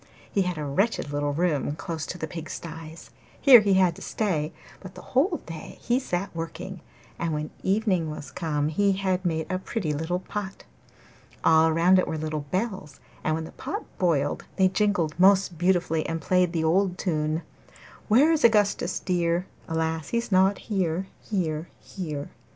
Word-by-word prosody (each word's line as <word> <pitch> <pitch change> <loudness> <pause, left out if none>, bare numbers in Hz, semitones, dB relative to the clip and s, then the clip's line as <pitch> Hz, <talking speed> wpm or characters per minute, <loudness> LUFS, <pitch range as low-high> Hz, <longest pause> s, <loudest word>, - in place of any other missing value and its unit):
He 200 - +2
had 180 -2 -1
a 150 - -3
wretched 145 +1 0
little 145 0 0
room 150 -2 0
close 160 -1 -5
to 180 - -5
the 160 - -3
pigsties; 165 0 -8 0.3
here 260 -4 +9
he 200 -2 +3
had 185 -3 +4
to - - -11
stay, 165 -8 -1 0.3
but 185 -1 -11
the - - -10
whole 330 +8 +2
day 165 -2 -8
he 245 +2 +1
sat 180 -8 -3
working, 165 +3 -6 0.4
and 165 -2 -1
when 150 0 -4
evening 190 -5 +1
was 150 -1 -7
come 155 -4 -1
he 200 +5 +2
had 190 -1 -1
made 160 -3 0
a 185 - 0
pretty 190 -5 -2
little 160 +4 -1
pot. 195 +1 -6 0.8
All 160 0 +5
round 175 +4 +5
it - - 0
were 160 - -2
little 155 -1 -3
bells, 185 - -3 0.2
and 155 - +1
when 160 - -3
the 160 - -9
pot - - -5
boiled 150 -6 +1
they 190 -1 +4
jingled 190 -5 +1
most 190 -3 +4
beautifully 175 -3 +2
and 165 0 -2
played 180 +2 +2
the 165 -2 -1
old 180 +3 +2
tune 155 -2 -1 0.6
'Where 265 +9 +5
is 315 -2 +1
Augustus 210 -3 +3
dear? 175 -1 0 0.2
Alas! 160 -1 -2
he's 235 -2 -2
not 190 +1 +4
here, 185 -3 -1 0.2
here, 165 -6 -2
here! 155 -7 -6
175 Hz, 170 wpm, -26 LUFS, 160-195 Hz, 0.8 s, here